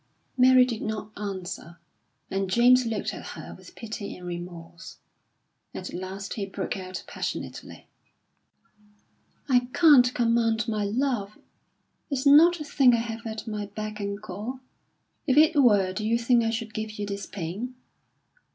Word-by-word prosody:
Mary 255 0 +6
did 235 -3 -4
not 215 0 -4
answer, 185 -4 -6 0.5
and 195 0 -1
James 245 +4 +5
looked 220 -2 -2
at - - -8
her - - -9
with - - -16
pity 215 -3 -6
and 180 - -11
remorse. 175 -1 -8 0.8
At 185 - -6
last 190 +2 -6
he 200 -3 -4
broke 195 -1 -4
out 185 -1 -6
passionately: - - -6 1.6
"I 250 -2 +3
can't 285 -7 +6
command 230 -2 +1
my 215 -2 -1
love! 220 -2 -1 0.7
It's 275 -1 -2
not 325 +5 +7
a - - -4
thing 270 -4 +4
I - - +1
have 230 0 -5
at 220 0 -6
my 210 -2 -4
beck 215 +1 -6
and 200 0 -3
call. 215 +7 -7 0.7
If 265 0 +2
it 310 0 +6
were, 200 -7 +4
do 215 - -4
you 225 +2 +2
think 235 0 +3
I 225 - +1
should 225 -1 -4
give 215 0 -4
you 205 - -3
this 200 -1 -5
pain? 205 +8 -5
220 Hz, 150 wpm, -26 LUFS, 200-245 Hz, 1.6 s, not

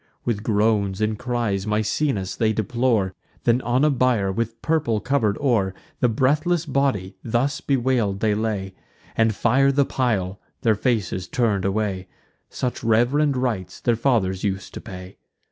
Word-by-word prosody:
With 115 -4 -1
groans 105 -2 +1
and 110 0 0
cries 115 -6 -1
Misenus 105 -1 0
they 110 -1 +1
deplore: 110 -2 0 0.3
Then 120 +2 +3
on 125 +4 +2
a 150 - +4
bier, 120 -7 +2
with 115 +3 -3
purple 155 -9 +1
cover'd 110 -5 +1
o'er, 110 -9 +1 0.2
The 125 - +3
breathless 155 +8 +1
body, 130 - 0
thus 125 +5 0
bewail'd, 120 -7 +1
they 110 0 +2
lay, 105 -3 -2 0.4
And 110 -1 +2
fire 135 +6 +3
the 140 0 +3
pile, 100 -9 -1 0.2
their 115 - +4
faces 105 -5 -1
turn'd 105 -3 0
away: 100 -2 -1 0.4
Such 125 -2 -3
reverend 130 +6 +2
rites 115 -8 -2
their 120 -2 +1
fathers 110 -7 +1
us'd 95 -2 -3
to - - -7
pay. 90 0 -10
110 Hz, 145 wpm, -23 LUFS, 100-130 Hz, 0.4 s, a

